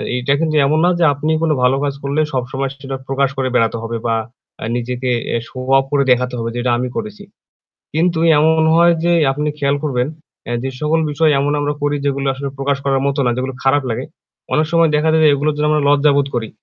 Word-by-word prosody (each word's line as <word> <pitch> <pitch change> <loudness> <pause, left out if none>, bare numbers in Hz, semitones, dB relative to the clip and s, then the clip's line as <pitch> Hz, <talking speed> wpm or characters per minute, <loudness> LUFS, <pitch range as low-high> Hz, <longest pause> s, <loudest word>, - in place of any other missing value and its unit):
এইটা 125 +2 0
কিন্তু 155 -1 0
এমন 155 +3 +2
না - - +4
যে - - +3
আপনি 150 +3 -2
কোন 160 -1 +1
ভালো 125 +1 +4
কাজ 140 - -1
করলে 140 +2 0
সবসময় 135 +1 -2
সেটা 135 -1 -6
প্রকাশ 135 0 +1
করে 130 -1 0
বেড়াতে 115 0 +2
হবে 115 0 -3
বা 115 -1 +1 0.5
আ - - -3
নিজেকে 125 +1 -3 0.3
এ - - +2
শো - - -13 0.2
অফ 135 - +1
করে 140 -1 +2
দেখাতে 125 0 +1
হবে 115 0 -3
যে - - -2
এটা 125 - +1
আমি 125 +1 -2
করেছি। 210 -2 -6 0.7
কিন্তু 165 +1 +1 0.2
এমন 160 +1 +3
হয় 170 +1 +5
যে 175 - +2 0.2
আপনি 150 +2 -2
খেয়াল 140 0 +1
করবেন 125 -4 0 0.4
এ - - -3
যে 135 - -2
সকল 155 +2 +1
বিষয় 155 +1 +2
এমন 145 +1 0
আমরা 145 0 -1
করি 145 0 0
যেগুলো 140 -1 -1
আসলে 140 +1 -5
প্রকাশ 140 0 0
করার 135 -1 +1
মত 140 +1 -1
না 120 - +2
যেগুলো 130 +1 -3
খারাপ 135 +1 +2
লাগে 115 - -3 0.5
অনেক 155 +1 +2
সময় 165 -1 +4
দেখা 150 +2 +2
যায় 160 0 +3
এগুলোর 150 +2 0
জন্য 150 0 +1
আমরা 150 -1 +1
লজ্জাবোধ 145 -1 +3
করি। 110 -2 -2
140 Hz, 220 wpm, -17 LUFS, 130-155 Hz, 0.7 s, হয়